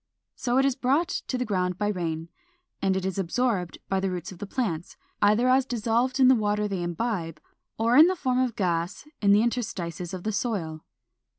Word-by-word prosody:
So 245 -1 0
it 270 - +4
is 275 -2 +2
brought 280 +7 +1
to 260 - -3
the 250 - -1
ground 180 -4 -1
by 205 - 0
rain, 165 -4 -3 0.5
and 190 -1 +2
is 190 0 -2
absorbed 190 -1 -1
by 195 - 0
the 190 0 0
roots 180 -1 -5
of 180 - -12
plants, 180 -11 -3 0.2
either 215 +4 +4
as 260 +1 +4
dissolved 240 +1 0
in 260 - +7
the 260 - +8
water 210 -2 +1
they 195 -3 -3
imbibe, 175 -2 -3 0.4
or 230 +2 +2
in 310 +5 +9
the 370 - +1
form 255 -6 0
of 255 -3 0
gas 175 - -2
in 200 -1 +4
the 205 +2 +5
interstices 180 -8 -3
of 185 -2 -6
the 220 - -1
soil. 195 -8 -3
210 Hz, 195 wpm, -26 LUFS, 180-250 Hz, 0.5 s, in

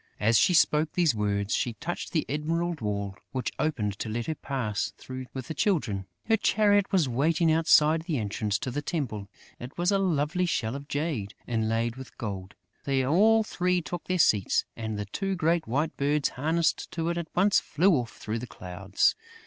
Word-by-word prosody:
As 110 +3 +3
she 180 - +4
spoke 155 -1 +3
these 170 -6 +3
words, 100 -1 -1
she 120 - 0
touched 175 +9 -5
the 155 - 0
emerald 165 +2 -1
wall, 100 -2 -2 0.2
which 130 -1 -2
opened 105 -10 -1
to 110 - -3
let 115 +2 -2
her 160 - -1
pass 125 -9 -3
through 130 0 -7
with 130 -2 -6
the - - -4
Children. 130 - 0 0.2
Her 225 0 +3
chariot 205 -2 +3
was 180 -8 +3
waiting 160 +6 +2
outside 160 -1 +4
the 160 -3 -2
entrance 105 -1 -1
to 125 - -4
the 145 +4 -2
temple. 120 - -3 0.3
It 125 +4 -9
was 175 +3 +2
a 200 - +3
lovely 180 0 +1
shell 115 -7 -1
of 140 0 -7
jade, 145 -10 -2
inlaid 115 +1 -1
with 130 -1 -11
gold. 95 -4 -5 0.3
They 135 -2 +1
all 215 +10 +4
three 180 -3 0
took 175 +1 -6
their 185 - 0
seats; 105 - +3
and 110 -2 -4
the 105 - -3
two 195 - -2
great 165 -1 +1
white 145 +7 -1
birds 145 +1 +1
harnessed 160 +5 0
to 165 0 -1
it 170 - -1
at 170 - -5
once 195 +3 +4
flew 185 +5 +2
off 120 -6 -2
through 110 +2 -3
the 125 - -6
clouds. 95 0 0
145 Hz, 190 wpm, -27 LUFS, 110-170 Hz, 0.3 s, she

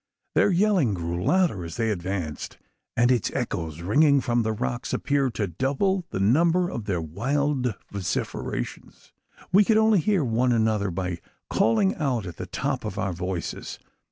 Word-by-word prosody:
Their - - +4
yelling 180 - +3
grew 85 0 -3
louder 175 - +2
as 85 0 -7
they 110 -1 +1
advanced; 90 -5 -4 0.4
and 120 +2 +4
its 120 -4 +2
echoes, 85 - -3
ringing 140 - +4
from 120 -2 +1
the 110 0 0
rocks, 120 +2 -3
appeared 140 -4 0
to 105 - 0
double 140 - 0
the - - -3
number 165 - +3
of 110 - -5
their 95 -4 -1
wild 125 - -1 0.2
vociferations. 95 -9 -4 0.4
We 200 +3 +6
could 215 +2 +3
only 220 -2 +5
hear 195 -1 +2
one 125 +1 +2
another 110 -3 +1
by 90 -1 -3 0.3
calling 155 - +3
out 130 -9 -1
at 85 -3 -8
the - - -6
top - - -2
of - - -5
our 95 -1 -1
voices. 90 0 -4
115 Hz, 160 wpm, -25 LUFS, 95-150 Hz, 0.4 s, We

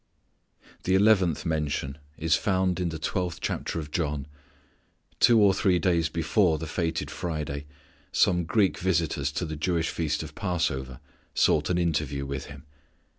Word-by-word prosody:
The 95 - +3
eleventh 95 -6 +3
mention 75 -3 -2 0.2
is 80 0 +2
found 95 -2 +1
in 90 -1 0
the 80 - -4
twelfth 90 +2 -2
chapter - - -3
of 75 -2 -7
John. 75 -5 -1 0.9
Two 120 -2 +6
or 100 -2 +6
three 95 -2 +2
days 85 -2 +1
before 85 +1 +2
the 80 - -5
fated 80 +1 -2
Friday 75 -5 -4 0.4
some 90 -1 +3
Greek 95 +3 +2
visitors 80 -6 0
to 90 - -2
the 80 -1 -5
Jewish 80 +1 0
feast 80 -1 -1
of 80 -1 -9
Passover 70 -9 -2 0.4
sought 75 -1 +3
an 90 - +1
interview 75 -5 -1
with 70 0 -4
Him. 70 -2 -11
80 Hz, 150 wpm, -27 LUFS, 75-90 Hz, 0.9 s, Two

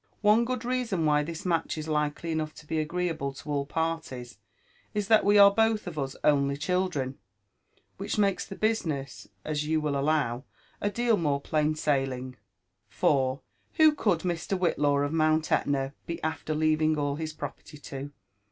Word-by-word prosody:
One 215 +3 +5
good 250 -1 -3
reason 240 -9 0
why 150 -1 +4
this 160 +3 -6
match 170 -2 0
is 155 0 -5
likely 150 +2 -1
enough 155 -1 -2
to 150 - -13
l>e 160 0 0
agreeable 165 -3 -2
to 140 - -11
all 140 -1 -1
parlies 145 -9 -3 0.6
is, 205 -2 -1
that 220 -1 +6
we 205 +1 +4
are 200 0 +8
both 225 0 +2
of 165 -4 -5
us 135 -1 -3
only 140 -1 +3
children; 155 -5 -1 0.8
which - - -3
makes 200 -2 +2
the 195 - -8
business, 160 -12 -2 0.2
as 150 -1 -2
you 160 0 +2
will 150 -2 -1
allow, 140 -3 0 0.4
atleal 225 +1 +1
more 145 -4 +1
plain 155 +1 0
«ailing. 130 -3 0 0.5
For, 135 -1 +1 0.3
who 315 -1 +6
could 200 - +1
Mr. 175 +2 -2
Whillaw 145 -5 +2
of 145 - -3
Mount 155 0 +2
Etna 135 -1 +1
be 170 - -4
after 160 -1 -2
leaving 155 0 +2
all 145 -1 -1
his 160 0 -4
property 150 0 -8
to? 145 -1 -7
155 Hz, 165 wpm, -28 LUFS, 145-180 Hz, 0.8 s, are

